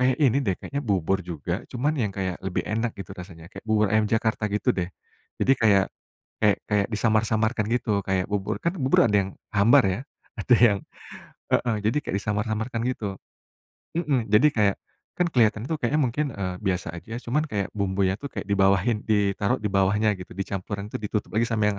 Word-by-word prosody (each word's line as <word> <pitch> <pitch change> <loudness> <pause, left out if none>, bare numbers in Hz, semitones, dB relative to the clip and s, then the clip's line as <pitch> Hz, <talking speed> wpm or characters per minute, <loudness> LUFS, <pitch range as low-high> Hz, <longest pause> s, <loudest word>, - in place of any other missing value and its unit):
kayak 125 0 +3
ini 140 -2 +3
deh, 100 -8 0
kayaknya 140 - -5
bubur 95 - 0
juga 85 +2 -4
cuman 140 +5 0
yang 125 -8 0
kayak 95 -2 -4
lebih 95 -1 -2
enak 115 +2 -2
gitu 95 -3 -8
rasanya, 90 -1 -11
kayak - - -8
bubur 110 -1 +2
ayam 110 -1 +3
Jakarta 110 -1 0
gitu 105 +5 +1
deh. 90 -4 -2 0.5
Jadi, 135 - +4
kayak 100 -4 +5 0.6
kayak 105 -2 +5
kayak 105 -1 +1
disamar-samarkan 110 +1 +1
gitu 105 -5 0
kayak 95 -1 0
bubur 100 +1 -2
kan 170 +2 -1
bubur 130 -6 +3
ada 105 - +1
yang 95 - -8 0.2
hambar 105 +3 +6
ya, 95 +1 -1 0.4
ada 125 - +4
yang 115 -4 +5 0.7
heeh. 115 -3 +2
Jadi 110 +7 +1
kayak - - -1
disamar-samarkan 110 +2 -2
gitu. 105 -7 -3 0.8
Mmm, 140 -9 0
jadi 110 +8 +5
kayak 100 -2 +3 0.4
kan 180 - +2
kelihatan 110 -2 +3
tuh 160 +4 -2
kayaknya 145 +6 +1
mungkin, 130 +5 0
eee, 90 -2 -3
biasa 90 -5 -2
aja 100 +7 -7
cuman 150 +6 +1
kayak 100 -6 -2
bumbunya 95 -1 0
tuh 140 - -5
kayak - - -4
dibawahin 100 +3 +3
ditaruh 105 +2 +2
di 105 - -1
bawahnya 100 +2 +3
gitu, 90 - -9
dicampuran 100 +1 -4
tuh - - -4
ditutup 105 0 -3
lagi 115 +2 +1
sama 110 -2 0
yang, 100 - -6
105 Hz, 185 wpm, -25 LUFS, 100-115 Hz, 0.8 s, hambar